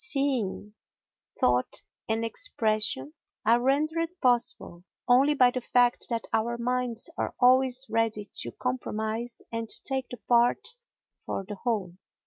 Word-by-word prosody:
Seeing, 260 - -1 0.7
thought 125 0 +1 0.3
and 225 +1 0
expression 215 - 0 0.3
are 235 +2 +4
rendered 310 +5 +1
possible 240 -8 0 0.2
only 270 +4 +5
by 250 -3 +5
the 255 - -3
fact 245 0 +2
that 230 -1 -2
our 235 +2 0
minds 245 -1 -1
are - - -2
always 255 +1 +4
ready 225 -2 0 0.2
to 120 - -5
compromise 220 - -3
and 230 -1 -4
to - - -6
take 265 -2 -2
the 245 - -7
part 240 0 +3 0.5
for 195 - -4
the - - -5
whole. 200 -5 -3
235 Hz, 130 wpm, -27 LUFS, 215-255 Hz, 0.7 s, only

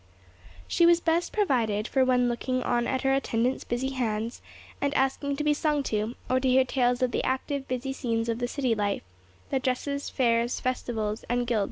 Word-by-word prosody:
She 340 - +4
was 340 0 +6
best 340 +1 +1
provided 230 - +1
for 265 - +2
when 250 -1 +3
looking 255 +1 -1
on 240 -1 +1
at 260 0 -1
her 270 0 +3
attendant's 255 -2 0
busy 245 +3 -2
hands, 230 -3 -2 0.4
and 285 0 0
asking 270 +1 +1
to 300 - -2
be 300 0 +3
sung 295 -1 0
to, 215 0 -2
or 255 +1 +2
to 260 - 0
hear 260 +1 +5
tales 250 -1 +1
of 250 - +1
the - - -1
active, 270 +1 -2
busy 255 +1 -3
scenes 230 -3 -1
of 230 0 -1
the 245 - -1
city 255 -2 0
life—the 95 - -4
dresses, 280 +2 -2
fairs, 235 -2 +1
festivals, 225 -4 -2
and 245 0 +1
guild - - -13
processions. 235 -3 +1
250 Hz, 195 wpm, -27 LUFS, 230-270 Hz, 0.4 s, was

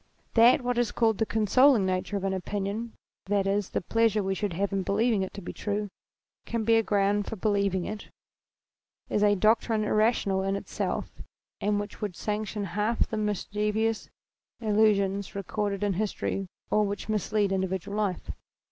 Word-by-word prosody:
That 240 +3 +6
what 245 -1 0
is 240 -3 +1
called 225 -3 +1
the 225 - +1
consoling 225 +1 +4
nature 185 +2 -1
of 195 - -5
an 195 0 0
opinion, 205 +4 -3 0.3
that 200 -1 +1
is, 200 0 0
the - - -2
pleasure 220 +1 +2
we 190 0 0
should 200 -1 -2
have 195 +3 -1
in 195 - +1
believing 210 +2 +1
it 190 - -3
to 200 - -7
be - - -6
true, 205 0 -3 0.5
can 230 -1 -2
be 230 +1 +3
a - - +4
ground 205 -1 +1
for - - -4
believing 200 -3 0
it, 215 0 -6 1.0
is 210 - +1
a 205 0 +5
doctrine 220 +2 +2
irrational 210 -3 +2
in 195 +1 0
itself 200 - -4 0.4
and 205 0 +1
which 205 -1 -7
would 205 -4 -3
sanction 210 0 -3
half 210 +3 +1
the - - -4
mischievous 210 +1 -1 0.5
illusions 205 -3 +2
recorded 200 0 -2
in 205 -1 +1
history 195 -1 -2 0.2
or 210 - +4
which 200 -1 -3
mislead 210 -1 0
individual 190 +1 -2
life. 205 -4 -2
205 Hz, 165 wpm, -28 LUFS, 195-215 Hz, 1.0 s, That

